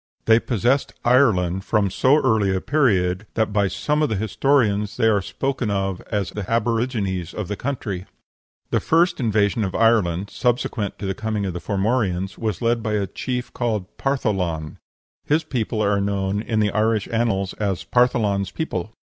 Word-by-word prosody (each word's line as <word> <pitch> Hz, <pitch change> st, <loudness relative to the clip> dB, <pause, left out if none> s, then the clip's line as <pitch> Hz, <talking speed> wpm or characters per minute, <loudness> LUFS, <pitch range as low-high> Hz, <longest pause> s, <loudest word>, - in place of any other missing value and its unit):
They 110 Hz, 0 st, +6 dB
possessed 125 Hz, +4 st, 0 dB
Ireland 95 Hz, -8 st, +3 dB
from 105 Hz, -3 st, +1 dB
so 130 Hz, +8 st, +4 dB
early 110 Hz, -6 st, +2 dB
a -, -, 0 dB
period 100 Hz, -8 st, +1 dB
that 110 Hz, -2 st, 0 dB
by 100 Hz, -1 st, +2 dB
some 150 Hz, -, -1 dB
of 150 Hz, -, +2 dB
the 110 Hz, -, 0 dB
historians 105 Hz, 0 st, +1 dB
they 120 Hz, -, +2 dB
are 105 Hz, -3 st, +3 dB
spoken 130 Hz, +2 st, -2 dB
of 95 Hz, -2 st, -1 dB
as 100 Hz, -5 st, -1 dB
the 105 Hz, -3 st, -6 dB
aborigines 115 Hz, -6 st, -1 dB
of 105 Hz, -4 st, -4 dB
the 105 Hz, -, -3 dB
country. 100 Hz, -7 st, -4 dB, 0.6 s
The -, -, +2 dB
first 175 Hz, +2 st, +2 dB
invasion 110 Hz, -2 st, +1 dB
of 95 Hz, -2 st, -3 dB
Ireland, 105 Hz, -5 st, +2 dB
subsequent 120 Hz, -4 st, -1 dB
to -, -, -6 dB
the 95 Hz, -, -1 dB
coming 110 Hz, 0 st, -2 dB
of 95 Hz, -, -3 dB
the 90 Hz, -, -5 dB
Formorians, 95 Hz, -3 st, -1 dB
was 110 Hz, -5 st, -3 dB
led 115 Hz, 0 st, +2 dB
by 110 Hz, -1 st, -2 dB
a 105 Hz, -2 st, +1 dB
chief 125 Hz, +5 st, -4 dB
called 110 Hz, -5 st, -2 dB
Partholan: 95 Hz, -, -1 dB, 0.5 s
his 155 Hz, +2 st, +2 dB
people 115 Hz, -7 st, -2 dB
are 100 Hz, -1 st, +2 dB
known 100 Hz, 0 st, -1 dB
in 110 Hz, -1 st, -1 dB
the 105 Hz, -1 st, +1 dB
Irish 110 Hz, 0 st, +1 dB
annals 110 Hz, -5 st, 0 dB
as 100 Hz, -4 st, -1 dB
"Partholan's 110 Hz, -6 st, +2 dB
people." 110 Hz, -, -4 dB
105 Hz, 170 wpm, -22 LUFS, 95-120 Hz, 0.6 s, They